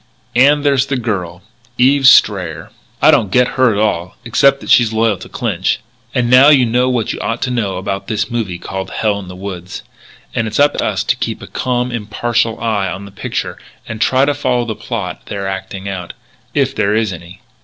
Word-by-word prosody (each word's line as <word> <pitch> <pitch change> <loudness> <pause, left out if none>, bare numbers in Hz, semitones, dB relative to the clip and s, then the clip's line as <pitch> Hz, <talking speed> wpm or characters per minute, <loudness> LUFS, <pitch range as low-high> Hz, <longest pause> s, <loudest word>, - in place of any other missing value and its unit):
And 145 +4 +4
there's 140 -2 +2
the 135 -1 -1
girl, 95 -7 -4 0.3
Eve 135 +2 +4
Strayer. 85 - +3 0.3
I 155 - +8
don't 125 -10 +2
get 125 +5 +3
her 130 -4 +2
at 100 - -2
all, 100 -3 -1
except 135 +3 +3
that - - -4
she's 120 -3 +5
loyal 110 -2 +1
to - - -11
Clinch.... - - -1 0.4
And 120 -1 +1
now 130 +4 +7
you 135 -4 +5
know 125 +2 +1
what 120 -4 -1
you - - -7
ought 115 +2 -2
to 125 - -1
know 105 -6 -1
about 95 +1 -4
this 110 +2 -2
movie 110 -7 -2
called 95 +2 -6
'Hell 105 -1 -1
in 95 - -9
the 90 - -9
Woods.' 90 -2 -7 0.5
And 115 -2 -1
it's 110 - -3
up 145 +1 +5
to - - 0
us - - -1
to - - +1
keep - - -4
a - - -6
calm, 125 0 -2
impartial 115 +1 -1
eye 105 -4 0
on 95 +2 -7
the 100 - -12
picture 100 - -4 0.3
and 110 -1 -6
try 130 +1 +3
to 145 - +1
follow 125 -4 0
the 110 - -3
plot 100 -5 -6
they're 100 -2 -4
acting 95 0 -5
out 90 -3 -5 0.4
if - - +1
there 100 +1 +1
is 110 -3 0
any." 85 +1 -11
110 Hz, 210 wpm, -16 LUFS, 95-125 Hz, 0.5 s, I